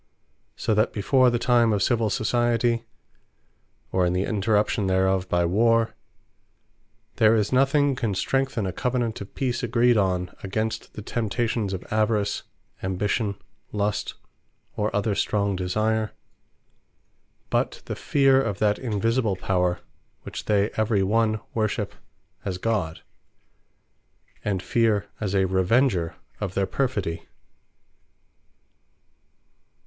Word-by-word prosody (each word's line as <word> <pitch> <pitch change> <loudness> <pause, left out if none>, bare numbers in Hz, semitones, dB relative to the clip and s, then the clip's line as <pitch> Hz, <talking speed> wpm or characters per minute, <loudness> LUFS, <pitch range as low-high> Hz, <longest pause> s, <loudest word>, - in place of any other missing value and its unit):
So 110 - 0
that 110 +2 +2
before 130 +5 +3
the 120 - +1
time 120 -1 +3
of 105 -2 +1
Civill 115 -3 +2
Society, 120 +2 +1 1.1
or 95 - +2
in 90 0 +2
the 90 +1 +1
interruption 105 0 +1
thereof 95 0 +1
by 85 0 +2
Warre, 115 +5 +3 1.2
there 110 0 +5
is 105 +2 0
nothing 140 +1 +3
can 115 -6 -1
strengthen 135 0 0
a 95 - -3
Covenant 120 -4 -1
of 100 - -9
Peace 125 -2 -1
agreed 120 0 +3
on, 90 -3 0
against 110 +3 -3
the 105 - -8
temptations 115 -1 -1
of 95 -2 -4
Avarice, 105 -1 +1 0.4
Ambition, 100 +3 -1 0.4
Lust, 105 -1 -1 0.6
or 105 +1 0
other 105 +1 +1
strong 100 0 0
desire, 110 +4 0 1.4
but - - 0
the - - -4
feare 135 -1 +3
of 105 -7 -2
that 105 -1 +1
Invisible 115 -2 0
Power, 90 -1 0 0.4
which - - -7
they 105 0 +2
every 110 -2 +2
one 110 +1 +1
Worship 110 -2 -1 0.5
as 95 -2 -3
God; 95 -6 -2 1.4
and 95 -3 -1
Feare 110 -4 +2
as 100 -3 -2
a 95 -1 +3
Revenger 95 0 +2 0.2
of 95 -3 -4
their 100 - +2
perfidy. 105 -10 -2
105 Hz, 120 wpm, -25 LUFS, 95-115 Hz, 1.4 s, there